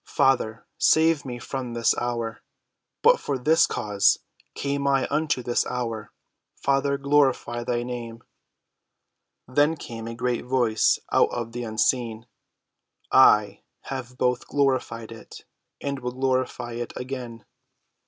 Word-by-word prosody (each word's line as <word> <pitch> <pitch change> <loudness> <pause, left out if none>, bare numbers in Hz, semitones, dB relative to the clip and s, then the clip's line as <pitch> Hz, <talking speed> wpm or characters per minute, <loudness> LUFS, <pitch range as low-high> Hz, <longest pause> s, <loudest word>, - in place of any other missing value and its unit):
Father, 120 -4 +2
save 160 -2 +4
me 125 -2 -5
from 125 0 -5
this 115 0 +2
hour. 120 -2 -3 0.6
But 485 +2 +6
for 140 - -2
this 160 +6 +4
cause 105 -3 +2 0.4
came 140 0 -2
I 135 -1 +2
unto 150 -4 0
this 120 0 +1
hour. 115 -3 -4 0.4
Father, 140 0 +1
glorify 140 -4 +1
thy 120 0 -1
name." 120 -2 -6 1.2
Then 145 +5 +2
came 115 -4 -7
a 115 - -6
great 125 0 -1
Voice 120 -3 +2
out - - +4
of 120 -1 -4
the 120 +1 -5
unseen. 115 0 0 0.9
"I 105 -6 +5 0.3
have 125 -2 -6
both 125 -1 0
glorified 130 -5 0
it, 115 - -12 0.3
and 140 -1 -3
will 125 0 -4
glorify 130 -2 -1
it 120 0 -5
again." 125 -3 -6
125 Hz, 125 wpm, -25 LUFS, 115-135 Hz, 1.2 s, But